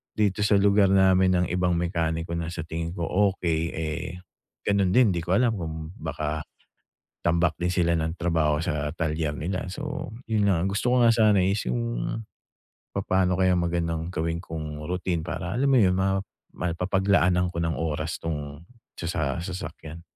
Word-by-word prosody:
dito 105 -1 +1
sa 105 - +4
lugar 100 0 +5
namin 95 -1 +5
ng 90 0 +2
ibang 90 0 +1
mekaniko 85 -1 -1
na 85 -1 -3
sa 85 0 -4
tingin 80 +1 -4
ko 85 - -3 0.3
okey, 85 -3 -1
eh, 80 0 -3 0.6
ganun 100 -3 +2
din. 125 -5 +6
Di 85 - -1
ko 85 +3 0
alam 115 0 +2
kung 80 -1 -5
baka 75 0 -3 0.8
tambak 85 0 +2
din 90 - +1
sila 85 -2 +2
ng 80 +2 -2
trabaho 80 -3 +1
sa 75 -2 -1
talyer 80 -2 -1
nila. 90 +4 -3
So, 150 +7 -5 0.2
yun 105 -3 +2
nga 85 -3 +2
gusto 105 +6 +1
ko 120 - +5
nga 115 - +7
sana 105 -4 +4
is 100 +2 +1
yung - - 0 1.1
papaano 95 -2 +1
kaya 95 -1 +4
magandang 85 -1 -1
gawin 85 0 -2
kong 75 -2 -6
routine 90 -1 -1
para 85 +2 -4
alam 135 +3 +2
mo 135 - +5
yun, 90 -4 +4
ma 95 +1 +1 0.4
mapapaglaanan 90 0 +1
ko 85 - -2
ng 80 -1 0
oras 80 0 -2
'tong 75 -1 -5 0.3
sa 80 -5 -2
sa - - -3
sasakyan. 85 -3 -7
85 Hz, 165 wpm, -26 LUFS, 80-95 Hz, 1.1 s, nga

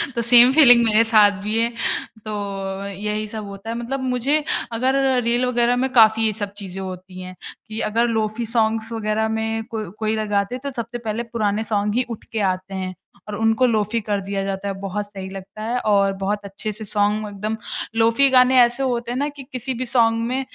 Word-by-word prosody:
तो 235 - 0
same 245 +1 +8
feeling 245 -5 +8
मेरे 220 0 +4
साथ 205 -3 +5
भी 215 +1 0
है। 230 +1 +2 0.6
तो 215 -1 -3 0.5
यही 210 +2 -3
सब 215 0 -6
होता 200 +2 -9
है 230 - -3
मतलब 265 +3 -3
मुझे 280 +5 +1 0.3
अगर 260 +3 +1 0.3
रील 240 +2 +1
वग़ैरह 240 -1 +2
में 265 - 0
काफ़ी 225 -1 +5
ये 220 - +2
सब 200 0 -5
चीज़ें 195 -2 -7
होती 185 0 -8
हैं 185 0 -9 0.3
कि 220 0 -6
अगर 230 +2 +2
लोफी 220 0 -1
सॉन्ग्स 225 0 0
वग़ैरह 220 0 -1
में 225 0 -2
कोई 215 -4 -4
कोई 220 0 0
लगाते 210 +1 -1
तो 280 - -3
सबसे 235 -2 -5
पहले 230 0 -3
पुराने 215 -1 0
सॉन्ग 210 -1 -1
ही 250 - +2
उठ 230 - -7
के 225 - -2
आते 185 +1 -7
हैं 185 -1 -4 0.3
और 210 - -5
उनको 225 +3 +2
लोफी 220 -1 +1
कर 205 -1 -1
दिया 195 0 -3
जाता 195 0 -4
है 200 - -2
बहुत 200 +1 -3
सही 195 -2 -8
लगता 195 +2 -9
है 240 +3 -1
और 200 -1 +3
बहुत 205 +2 0
अच्छे 200 +2 -5
से 215 +1 -8
सॉन्ग 210 +1 0
एकदम 210 +2 -4 0.4
लोफी 230 +5 +4
गाने 255 0 +5
ऐसे 240 +3 +2
होते 240 -2 -2
हैं 245 - -2
ना 285 - 0
कि - - -7
किसी 255 +1 -3
भी 255 - -2
सॉन्ग 230 -2 +2
में 255 +2 -1
220 Hz, 205 wpm, -21 LUFS, 205-235 Hz, 0.6 s, same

